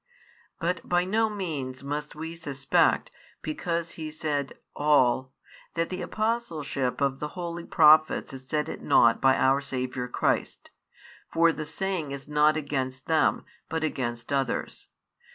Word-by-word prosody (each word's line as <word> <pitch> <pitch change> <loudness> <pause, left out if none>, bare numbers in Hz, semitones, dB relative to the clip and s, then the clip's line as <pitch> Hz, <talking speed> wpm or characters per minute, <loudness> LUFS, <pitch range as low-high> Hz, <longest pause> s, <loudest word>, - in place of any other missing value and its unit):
But 170 +1 -1
by 175 0 +3
no 220 +3 +2
means 145 -11 -4
must 150 +2 -4
we 160 +2 -6
suspect, 140 -4 +1 0.3
because 170 +2 -2
He 155 -1 -6
said: 150 -3 -2 0.2
All, 130 -3 +3 0.4
that 165 0 0
the 185 0 -4
apostleship 160 - -2
of 135 -1 +1
the 150 - -2
holy 170 -1 -4
Prophets 155 -2 +5
is 130 -1 -10
set 150 +2 -1
at - - -6
naught 115 0 +4
by 135 0 +5
Our 135 +1 +3
Saviour 130 -2 -3
Christ; 125 - -1 0.6
for 170 0 +4
the 155 -1 -5
saying 165 -3 -2
is 140 0 -7
not 150 +1 +3
against 130 -3 -3
them, 160 -1 +2 0.2
but 160 0 -2
against 120 -4 -3
others. 135 -3 -2
150 Hz, 140 wpm, -27 LUFS, 135-165 Hz, 0.6 s, Prophets